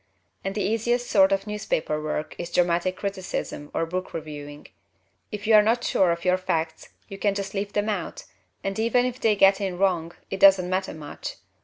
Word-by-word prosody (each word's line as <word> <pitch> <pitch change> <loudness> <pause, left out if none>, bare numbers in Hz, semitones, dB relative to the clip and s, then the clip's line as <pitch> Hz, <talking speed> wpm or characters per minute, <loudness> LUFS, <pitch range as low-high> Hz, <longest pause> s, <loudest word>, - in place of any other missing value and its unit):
And 195 0 -3
the 210 - 0
easiest 240 +3 0
sort 195 -1 +5
of 195 0 +1
newspaper 195 -7 -2
work 155 0 -3
is 170 - -4
dramatic 180 +1 +1
criticism 190 -6 -4
or 165 - -1
book 185 +2 -4
reviewing. 150 -2 -8 0.6
If 210 -1 -6
you 220 - +3
are 215 - +9
not 230 +3 +1
sure 185 -3 +3
of 170 +1 -3
your 180 0 +4
facts 165 -3 -2 0.2
you 195 - -9
can 200 -1 +1
just 195 -1 -4
leave 200 0 -3
them 205 0 0
out, 200 -6 -3 0.4
and 195 +2 -3
even 235 +2 +3
if 250 0 -3
they 220 -4 +3
get 195 0 +5
in 190 -3 -2
wrong 175 -3 +1 0.2
it 195 - -3
doesn't 190 -2 +6
matter 190 -1 -1
much. 150 -2 -7
195 Hz, 195 wpm, -25 LUFS, 170-210 Hz, 0.6 s, are